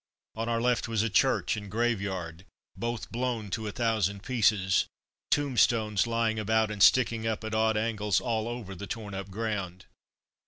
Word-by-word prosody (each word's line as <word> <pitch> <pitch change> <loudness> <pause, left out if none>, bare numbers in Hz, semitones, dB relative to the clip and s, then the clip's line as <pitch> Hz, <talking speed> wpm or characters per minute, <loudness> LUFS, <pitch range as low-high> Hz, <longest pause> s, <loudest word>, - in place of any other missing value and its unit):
On 115 +1 -3
our 115 0 +1
left 120 -1 +1
was 110 -2 0
a 115 - -1
church 130 +2 +2
and 100 -1 -7
graveyard, 95 -7 -2 0.3
both 120 -1 -4
blown 115 -4 -2
to 110 +1 -3
a - - -3
thousand 105 -4 0
pieces. 105 -6 +2 0.4
Tombstones 115 -6 +2
lying 115 -1 0
about 110 +1 +1
and 105 -1 -5
sticking 115 -1 +4
up 110 0 -2
at 110 0 -4
odd 110 0 +2
angles 105 -2 +1
all 115 -2 -1
over 120 -5 -5
the 100 +2 -7
torn 105 -3 -6
up 95 0 -5
ground. 100 -3 -4
110 Hz, 165 wpm, -29 LUFS, 100-115 Hz, 0.4 s, sticking